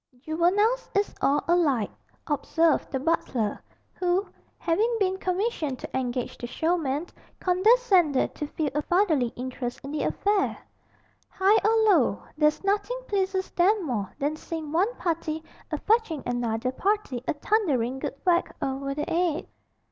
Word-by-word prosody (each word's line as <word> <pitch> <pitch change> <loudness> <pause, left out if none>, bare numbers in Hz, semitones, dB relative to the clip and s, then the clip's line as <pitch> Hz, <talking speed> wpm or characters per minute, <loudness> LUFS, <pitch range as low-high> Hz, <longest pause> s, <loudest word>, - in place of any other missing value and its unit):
'Juveniles 350 - +1
is 405 +1 +1
all 285 +1 +2
alike,' 300 -11 +2 0.3
observed 320 +1 +1
the 265 - -1
butler, 255 -8 -1 0.3
who, 360 +2 +1 0.3
having 440 +8 +1
been 380 -1 +1
commissioned 365 - -1
to - - -8
engage 250 -1 -2
the 240 - -5
showmen, 315 0 0 0.3
condescended 370 - +3
to 295 - -4
feel 300 -1 -2
a 295 - 0
fatherly 330 -7 +2
interest 250 -1 -5
in 275 - -6
the 300 - -2
affair; 405 -1 +1 0.8
''igh 395 +3 +5
or 445 +1 +4
low, 255 - +2
there's 300 +2 +2
nothing 410 +5 0
pleases 380 -2 -1
'em 390 +1 +4
more 210 -9 -2
than 295 +2 -1
seeing 315 -1 -6
one 370 +8 +2
party 320 -2 -2 0.3
a 305 - -2
fetching 420 - +1
another 245 0 -1
party 370 - -1
a - - 0
thunderin' 280 - +1
good - - -4
whack 350 -1 +2
over 275 +1 -2
the 300 - -2
'ead. 335 -2 0
325 Hz, 140 wpm, -26 LUFS, 275-390 Hz, 0.8 s, igh